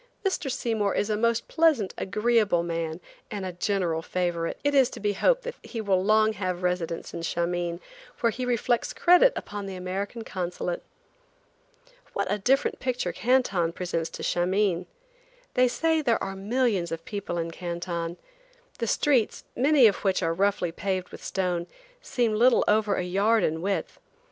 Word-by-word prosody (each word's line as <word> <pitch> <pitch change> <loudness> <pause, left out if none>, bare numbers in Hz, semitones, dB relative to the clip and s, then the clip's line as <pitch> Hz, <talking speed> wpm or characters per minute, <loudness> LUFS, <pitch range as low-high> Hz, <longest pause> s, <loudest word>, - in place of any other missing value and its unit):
Mr. 370 -7 0
Seymour 225 -6 0
is 205 - 0
a - - +2
most 230 +2 +1
pleasant, 310 - +2
agreeable 210 -3 +2
man, 165 -1 -3 0.3
and 200 -2 -4
a 185 - -3
general 175 -2 -1
favorite. 175 -1 -2
It 285 0 +2
is 265 -3 +5
to - - -9
be 205 0 0
hoped - - +2
that - - -4
he 230 - -7
will 195 -4 +1
long 215 +1 +4
have 185 -3 -2
a - - -12
residence 180 -2 -2
in - - -5
Shameen, 170 +1 -1 0.4
where 230 -1 +2
he 255 +4 -5
reflects 240 -1 0
credit 360 +8 +6
upon 205 -1 -5
the 190 - -6
American 195 +5 -4
Consulate. 180 -3 -3 1.3
What 200 -1 -1
a 210 - 0
different 265 +7 +1
picture 255 -1 -2
Canton 200 -10 +1
presents 170 -2 -2
to - - -7
Shameen. 180 0 +1 0.7
They 255 0 +4
say 320 +6 +1
there 235 -6 +1
are 195 0 -4
millions 205 -3 0
of 165 0 -5
people 200 -4 -4
in 165 0 -2
Canton. 170 0 -4 0.6
The 230 - -1
streets, 255 -2 +2
many 275 +1 +5
of 210 - +5
which 190 -2 0
are 165 - +1
roughly 195 -1 +1
paved 185 +1 -2
with - - -11
stone, 180 -2 -1 0.3
seem 240 - 0
little 235 +3 +4
over 210 -1 +3
a - - -1
yard 200 +5 +2
in 160 +1 0
width. 195 +2 -2
200 Hz, 170 wpm, -26 LUFS, 175-235 Hz, 1.3 s, credit